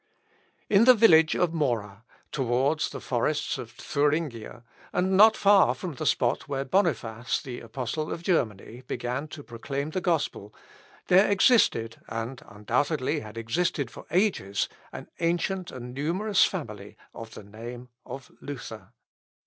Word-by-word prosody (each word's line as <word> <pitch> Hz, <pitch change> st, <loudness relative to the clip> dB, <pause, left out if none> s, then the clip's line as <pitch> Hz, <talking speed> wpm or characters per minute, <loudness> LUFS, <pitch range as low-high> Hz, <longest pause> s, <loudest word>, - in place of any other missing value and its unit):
In 210 Hz, +2 st, +5 dB
the 255 Hz, 0 st, +8 dB
village 165 Hz, -8 st, +6 dB
of 175 Hz, -2 st, +1 dB
Mora, 115 Hz, -8 st, -2 dB, 0.3 s
towards 135 Hz, +4 st, 0 dB
the -, -, -7 dB
forests 145 Hz, +4 st, -1 dB
of 115 Hz, -, -7 dB
Thuringia, 140 Hz, -2 st, -2 dB, 0.3 s
and 185 Hz, +1 st, +1 dB
not 220 Hz, +3 st, +7 dB
far 200 Hz, -1 st, +5 dB
from 180 Hz, -4 st, -6 dB
the 130 Hz, -, -4 dB
spot 120 Hz, +4 st, +1 dB
where 135 Hz, -1 st, -2 dB
Boniface, 125 Hz, -, 0 dB
the 125 Hz, -2 st, -7 dB
Apostle 130 Hz, +6 st, -4 dB
of 170 Hz, -, -5 dB
Germany, 120 Hz, -, -1 dB
began 125 Hz, +5 st, -3 dB
to 150 Hz, -1 st, -10 dB
proclaim 140 Hz, +5 st, -5 dB
the 185 Hz, -, -2 dB
gospel, 160 Hz, -, -1 dB, 0.5 s
there 190 Hz, +3 st, +5 dB
existed, 195 Hz, -, +3 dB
and, 115 Hz, +3 st, -5 dB
undoubtedly, 130 Hz, +8 st, -1 dB
had 110 Hz, -1 st, -10 dB
existed 130 Hz, +2 st, -1 dB
for -, -, -12 dB
ages, 175 Hz, -, +1 dB, 0.2 s
an -, -, -8 dB
ancient 175 Hz, +2 st, -1 dB
and 125 Hz, -1 st, -8 dB
numerous 180 Hz, +10 st, +2 dB
family 105 Hz, -, -6 dB, 0.2 s
of 115 Hz, 0 st, -10 dB
the -, -, -9 dB
name 120 Hz, +4 st, -9 dB
of 135 Hz, -2 st, -9 dB
Luther. 115 Hz, -8 st, -8 dB
135 Hz, 140 wpm, -27 LUFS, 115-170 Hz, 0.5 s, the